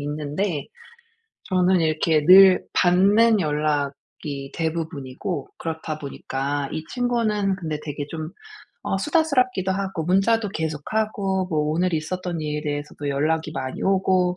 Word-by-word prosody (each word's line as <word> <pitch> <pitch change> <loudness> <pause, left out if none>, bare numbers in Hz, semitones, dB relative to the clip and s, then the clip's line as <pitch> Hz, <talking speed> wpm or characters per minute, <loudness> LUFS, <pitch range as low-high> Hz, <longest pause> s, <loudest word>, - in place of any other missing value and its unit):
있는데 150 +2 -3 0.8
저는 185 -1 +2
이렇게 155 -1 +1
늘 185 +1 +8
받는 205 +5 +4
연락이 145 -2 -3
대부분이고 160 -1 -4
그렇다 160 -1 -5
보니까 140 0 -3
이 155 - -4
친구는 225 -5 0
근데 155 -4 -4
되게 145 -1 -5
좀 160 -1 -5 0.5
어 - - -1
수다스럽기도 255 - +1
하고 190 -4 -3
문자도 200 +4 +2
계속 160 -2 -2
하고 200 -3 0
뭐 155 - 0
오늘 175 +3 0
있었던 170 +2 -3
일에 150 -1 -3
대해서도 145 -1 -4
연락이 155 +3 0
많이 130 -2 -5
오고 185 -2 +2
165 Hz, 290 characters per minute, -23 LUFS, 150-195 Hz, 0.8 s, 늘